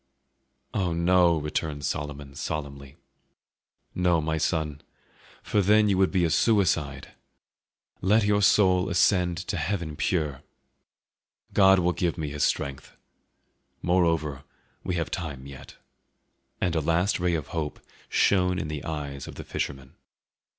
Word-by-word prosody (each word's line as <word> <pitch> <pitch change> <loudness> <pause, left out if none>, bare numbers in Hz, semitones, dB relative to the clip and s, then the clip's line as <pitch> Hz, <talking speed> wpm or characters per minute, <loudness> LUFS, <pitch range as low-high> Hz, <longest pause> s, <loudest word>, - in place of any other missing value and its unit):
"Oh 90 -4 0
no!" 85 0 +4
returned 75 -1 -3
Solomon 75 -1 -4
solemnly, 70 -2 -6 1.0
"no, 90 -2 +2
my 80 0 -1
son, 75 -2 -1 0.6
for 105 - +1
then 105 +2 +4
you 95 - +2
would 95 - +4
be 90 -3 +1
a 80 - 0
suicide! 80 - +1 0.9
Let 105 +4 +3
your 105 0 +2
soul 95 -2 +4
ascend 90 -3 +2
to 100 - -2
heaven 80 -1 -2
pure! 75 -5 -1 1.1
God 95 -1 +6
will 90 -1 +1
give 85 -1 -1
me 80 -3 -3
His 75 0 -5
strength. 70 -1 -1 0.9
Moreover, 80 -6 +1 0.4
we 90 - -2
have 85 -5 -2
time 70 -6 -5
yet." 70 0 -11 0.8
And 90 -2 0
a 80 - +1
last 85 +7 +1
ray 90 -1 +1
of 75 -3 -4
hope 80 -3 -4 0.3
shone 90 -2 +2
in 75 - -3
the 75 -2 -5
eyes 70 -3 -5
of - - -9
the - - -7
fisherman. 65 -1 -5
80 Hz, 135 wpm, -26 LUFS, 75-90 Hz, 1.1 s, God